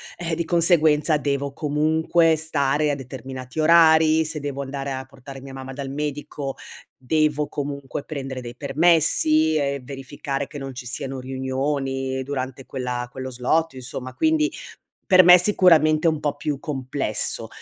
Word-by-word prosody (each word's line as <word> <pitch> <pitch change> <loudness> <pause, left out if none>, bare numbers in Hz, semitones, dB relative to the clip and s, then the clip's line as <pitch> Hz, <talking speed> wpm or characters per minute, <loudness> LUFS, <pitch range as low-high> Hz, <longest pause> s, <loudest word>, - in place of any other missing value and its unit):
eh, 170 -2 -4
di 170 +1 -2
conseguenza 160 -3 +3
devo 140 -1 -2
comunque 160 +3 +1
stare 150 -1 +1
a - - -1
determinati 130 +1 -8
orari, 160 -1 +5
se 155 -1 -4
devo 140 -1 -4
andare 135 0 -4
a 130 0 -5
portare 135 0 -12
mia 135 0 -10
mamma 135 0 -8
dal 135 0 -6
medico, 145 -1 -4 0.4
devo 150 +2 +1
comunque 140 -1 -5
prendere 135 -4 -5
dei 120 0 -8
permessi 155 +1 +3
e 140 -2 -1
verificare 135 +1 -5
che 145 - -9
non 135 -1 -6
ci 125 -1 -8
siano 135 +1 -4
riunioni 130 0 -3
durante 130 -1 -5
quella 125 -2 -4
quello 130 +1 -6
slot 135 +6 0
insomma, 130 0 -7
quindi, 315 +1 +2 0.6
per 185 -1 +7
me 180 +1 +9
sicuramente 165 -5 +4
è 160 - +5
un 155 - -4
po' 145 -1 -2
più 145 -1 -3
complesso, 135 -5 -2
140 Hz, 150 wpm, -23 LUFS, 135-155 Hz, 0.6 s, me